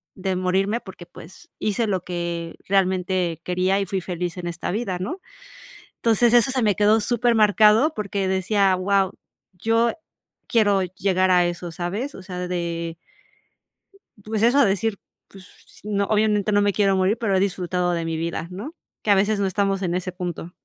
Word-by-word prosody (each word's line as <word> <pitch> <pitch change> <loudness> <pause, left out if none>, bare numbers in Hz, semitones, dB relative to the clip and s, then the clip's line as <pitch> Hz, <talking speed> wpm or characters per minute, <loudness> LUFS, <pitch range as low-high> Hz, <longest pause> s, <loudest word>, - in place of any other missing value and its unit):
de 190 0 -2
morirme 195 +5 0
porque, 185 -2 -11
pues, 185 - -14
hice 215 +2 0
lo 190 -3 -1
que 170 -1 -4
realmente 185 -3 +1
quería 185 +2 +1
y - - -1
fui 190 0 -1
feliz 180 0 -4
en 175 -1 -5
esta 170 +1 -4
vida", 195 -4 -2
¿no? 335 - -4 0.8
Entonces, 230 +1 +3
eso 240 +2 +5
se 255 -2 0
me 205 -3 +2
quedó 210 +1 +4
súper 240 +2 +1
marcado, 215 +7 +5
porque 200 -2 -2
decía: 190 +1 +2
"Wao, 195 0 +1 0.4
yo 225 +5 +1 0.6
quiero 205 -5 +3
llegar 185 +1 0
a 175 -1 +4
eso, 175 0 -4
¿sabes?". 200 - -4
O 190 - -10
sea, 180 -1 -5
de 170 -2 -3 1.3
pues 220 0 -2
eso, 260 +5 +5
decir 200 +1 0 0.3
pues, 195 -1 -14 0.4
no, 205 -1 -1
obviamente, 210 -1 +1
no 205 0 +3
me 205 0 +2
quiero 195 -2 +2
morir, 190 +3 +2
pero 210 -5 0
he - - +3
disfrutado 180 -2 -1
de 165 -1 -2
mi 165 0 -2
vida, 165 0 -3
¿no?, 215 - -7 0.3
que 210 - +3
a - - +7
veces 205 +2 +2
no 200 - +1
estamos 195 0 0
en 175 -1 -1
ese 185 0 -2
punto. 175 -2 -6
195 Hz, 175 wpm, -23 LUFS, 180-210 Hz, 1.3 s, a